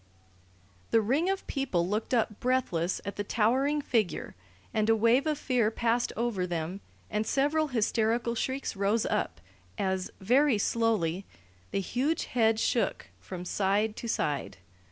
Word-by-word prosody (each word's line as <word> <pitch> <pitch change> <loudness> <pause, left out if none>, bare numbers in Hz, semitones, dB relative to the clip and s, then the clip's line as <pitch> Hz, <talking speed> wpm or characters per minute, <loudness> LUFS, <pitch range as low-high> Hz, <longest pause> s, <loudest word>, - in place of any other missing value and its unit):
The 225 - +4
ring 270 - +1
of 390 0 -2
people 220 - -1
looked 210 +3 -2
up 225 -4 +1
breathless 210 -9 0
at 200 - -5
the 205 - -1
towering 260 +8 +1
figure, 215 - 0 0.4
and 215 0 +1
a 225 - +6
wave 230 +7 +3
of 305 -1 +1
fear 250 -6 +1
passed 235 +1 0
over 220 -6 -1
them 175 +3 -3 0.3
and 210 0 +1
several 295 +3 +2
hysterical 235 -1 +1
shrieks 260 +2 -2
rose 200 +3 +1
up 85 - -1 0.4
as, 190 -1 -1
very 255 +5 +3
slowly, 200 -5 0 0.4
the 195 - -1
huge 270 - -1
head 225 -2 +2
shook - - 0
from 180 -1 -7
side 205 +3 +1
to 235 - -5
side. 150 -9 -1
225 Hz, 145 wpm, -29 LUFS, 200-255 Hz, 0.4 s, a